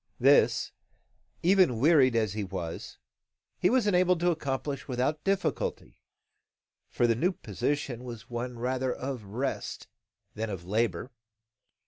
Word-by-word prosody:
This, -, -, +4 dB, 0.7 s
even 180 Hz, -, +4 dB
wearied 135 Hz, -3 st, +5 dB
as 110 Hz, -4 st, +1 dB
he 105 Hz, -1 st, -2 dB
was, 90 Hz, -4 st, -6 dB, 0.6 s
he 180 Hz, -, +3 dB
was 250 Hz, -2 st, +3 dB
enabled 180 Hz, -3 st, +3 dB
to 175 Hz, 0 st, +3 dB
accomplish 140 Hz, -3 st, -3 dB
without 130 Hz, +4 st, -1 dB
difficulty: 185 Hz, -, -2 dB, 0.9 s
for 120 Hz, -, +1 dB
the 115 Hz, -, +4 dB
new 170 Hz, -, +1 dB
position 140 Hz, -7 st, -3 dB
was 120 Hz, -3 st, -8 dB
one 120 Hz, 0 st, -4 dB
rather 130 Hz, +2 st, -1 dB
of 130 Hz, -2 st, -4 dB
rest 120 Hz, +8 st, -4 dB, 0.5 s
than 110 Hz, +1 st, -3 dB
of 95 Hz, -4 st, -6 dB
labour. 115 Hz, +5 st, -1 dB
130 Hz, 125 wpm, -29 LUFS, 115-155 Hz, 0.9 s, wearied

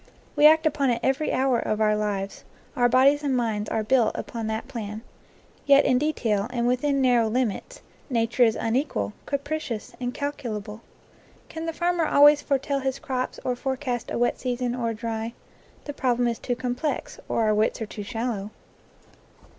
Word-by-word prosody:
We 295 Hz, 0 st, +8 dB
act 315 Hz, +1 st, +5 dB
upon 280 Hz, -3 st, +2 dB
it 235 Hz, -1 st, +1 dB
every 270 Hz, +3 st, +1 dB
hour 260 Hz, -2 st, +2 dB
of 215 Hz, -, -1 dB
our 215 Hz, -1 st, +3 dB
lives; 200 Hz, -2 st, -3 dB, 0.3 s
our 245 Hz, -1 st, +3 dB
bodies 270 Hz, +4 st, +5 dB
and 275 Hz, -3 st, 0 dB
minds 220 Hz, -3 st, -1 dB
are 220 Hz, -, -1 dB
built 235 Hz, 0 st, +2 dB
upon 230 Hz, -2 st, -4 dB
that 220 Hz, 0 st, -3 dB
plan. 215 Hz, -1 st, -6 dB, 0.6 s
Yet 280 Hz, 0 st, +6 dB
in 255 Hz, -2 st, +3 dB
detail, 230 Hz, -9 st, 0 dB
and 240 Hz, -1 st, -1 dB
within 270 Hz, +3 st, +1 dB
narrow 240 Hz, -3 st, +3 dB
limits, 240 Hz, -3 st, -2 dB, 0.3 s
nature 235 Hz, 0 st, 0 dB
is 225 Hz, -2 st, +3 dB
unequal, 225 Hz, -, -1 dB
capri 290 Hz, +2 st, -2 dB
cious, 230 Hz, -8 st, -6 dB
incalculable. 245 Hz, -5 st, -4 dB, 0.7 s
Can 325 Hz, +1 st, -6 dB
the -, -, 0 dB
farmer 345 Hz, 0 st, 0 dB
always 290 Hz, +1 st, +6 dB
foretell 275 Hz, 0 st, 0 dB
his 265 Hz, 0 st, -2 dB
crops 255 Hz, -1 st, -3 dB
or 250 Hz, -, 0 dB
forecast 255 Hz, -2 st, -3 dB
a -, -, -2 dB
wet 240 Hz, 0 st, +1 dB
season 245 Hz, -1 st, -2 dB
or 240 Hz, -2 st, -1 dB
a 225 Hz, -, -3 dB
dry? 225 Hz, 0 st, -4 dB, 0.5 s
The 290 Hz, -, -5 dB
problem 245 Hz, -3 st, +1 dB
is 235 Hz, -1 st, -2 dB
too 245 Hz, -, -2 dB
complex, 250 Hz, +4 st, -3 dB
or 230 Hz, -, +1 dB
our 215 Hz, -1 st, +3 dB
wits 215 Hz, +3 st, +1 dB
are 220 Hz, -, -3 dB
too 210 Hz, 0 st, -8 dB
shallow. 225 Hz, -2 st, -3 dB
245 Hz, 175 wpm, -25 LUFS, 225-275 Hz, 0.7 s, We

